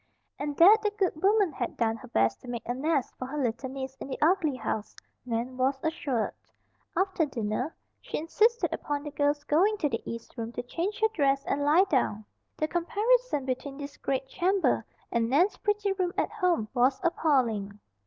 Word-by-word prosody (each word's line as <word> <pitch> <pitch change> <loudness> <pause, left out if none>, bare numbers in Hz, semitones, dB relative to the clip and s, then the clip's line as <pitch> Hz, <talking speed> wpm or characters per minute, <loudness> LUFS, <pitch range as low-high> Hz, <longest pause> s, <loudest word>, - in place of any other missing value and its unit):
And 290 -1 -3
that 390 +6 +9
the 425 - +1
good 370 -6 0
woman 400 -2 +4
had 240 -3 -4
done 225 -1 +1
her - - -12
best 115 0 +1
to - - -13
make 240 -2 -5
a 245 - 0
nest 280 0 0
for 255 - -4
her 295 +3 -5
little 255 -1 -1
niece 265 0 -6
in - - -7
the 265 - -4
ugly 315 -3 +3
house, 220 -4 -4 0.3
Nan 240 +2 -2
was 265 +1 +1
assured. 275 -8 -1 0.6
After 380 -3 +2
dinner 240 +3 -3 0.3
she - - -4
insisted 440 +9 +2
upon 290 -1 -3
the 295 - -6
girl's 290 0 +1
going 370 +9 +3
to 300 -7 0
the 230 - -2
east 230 0 -8
room 230 0 -4
to - - -4
change 355 - -3
her 440 - +6
dress 275 -4 +2
and 285 +1 0
lie 305 +6 +5
down. 220 - 0 0.3
The 310 - 0
comparison 410 - +1
between 270 +2 -3
this 285 -1 -7
great 265 -1 -1
chamber 375 +6 +1 0.3
and 230 -1 +1
Nan's 340 +10 +3
pretty 415 -1 0
room 370 -2 -1
at - - 0
home 360 - 0
was 260 +1 +3
appalling. 235 - +1
285 Hz, 190 wpm, -28 LUFS, 250-355 Hz, 0.6 s, that